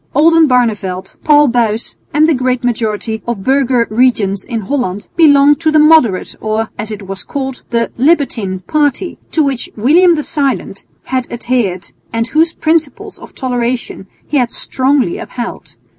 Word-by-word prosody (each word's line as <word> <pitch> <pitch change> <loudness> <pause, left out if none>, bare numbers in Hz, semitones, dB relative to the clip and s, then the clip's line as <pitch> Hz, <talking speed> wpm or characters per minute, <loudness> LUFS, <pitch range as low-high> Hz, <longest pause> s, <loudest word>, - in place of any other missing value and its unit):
Oldenbarneveldt, 250 - +2
Paul 295 -2 +5
Buys 230 -2 -1 0.2
and 305 +2 +3
the 325 - +3
great 255 -1 -1
majority 220 -2 -2
of 230 -5 -3
burgher 260 -2 +2
regents 215 -5 +1
in 230 -3 -4
Holland 205 -4 -3
belonged 290 -2 +5
to 325 -1 +1
the 310 - +3
moderate 300 -11 +4
or, 215 0 -2
as 210 +1 -6
it 210 -2 -7
was 195 0 -6
called, 265 -2 -5
the 230 -1 -1
"libertine" 245 - +1
party, 295 - -1
to 315 - +1
which 275 -4 -2
William 335 - +4
the 300 - -2
Silent 280 -4 -2 0.2
had 255 -1 -3
adhered 235 -7 -2 0.2
and 230 0 -1
whose 320 +2 +2
principles 320 -3 -2
of - - -14
toleration 245 -5 -3 0.2
he 295 - -1
had 245 -3 +1
strongly 260 -8 0
upheld. 240 -1 -7
250 Hz, 150 wpm, -14 LUFS, 220-290 Hz, 0.2 s, Paul